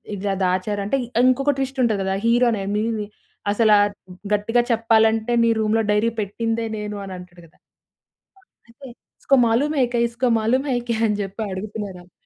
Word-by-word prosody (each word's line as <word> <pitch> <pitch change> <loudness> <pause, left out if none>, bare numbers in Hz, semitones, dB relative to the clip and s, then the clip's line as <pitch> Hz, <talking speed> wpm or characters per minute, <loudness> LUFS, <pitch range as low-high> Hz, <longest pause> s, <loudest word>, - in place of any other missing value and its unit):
ఇలా 195 0 -2
దాచారు 185 +3 0
అంటే 240 +7 0
ఇ - - -13 0.2
ఇంకొక 275 +3 +3
ట్విస్ట్ 270 0 -3
ఉంటది 220 -4 +1
కదా! 190 - -1
హీరో 240 +2 +4
అనేని 210 +1 -2 0.5
అసల 215 +1 +3 0.6
గట్టిగా 225 +4 +2
చెప్పాలంటే 225 0 +2
నీ 230 - +3
"రూమ్‌లో 220 +1 +1
డైరీ 210 +2 +2
పెట్టిందే 225 +3 -2
నేను" 210 0 -5
అని 190 - -7
అంటాడు 180 -1 -13
కదా! 160 - -29 0.8
ఆ! - - -26 0.3
అయితే 265 +4 -13 0.3
ఇస్కొ 275 - +3
మాలుం 275 +7 +1
హేకే 245 -2 +1
ఇస్కొ 240 +2 -1
మాలుం 255 +6 +1
హేకే 240 -2 -1
అని 210 -1 -1
చెప్పి 195 +3 -6
అడుగుతున్నారు 205 -1 -6
అలు. 180 - -24
225 Hz, 160 wpm, -22 LUFS, 205-240 Hz, 0.8 s, హీరో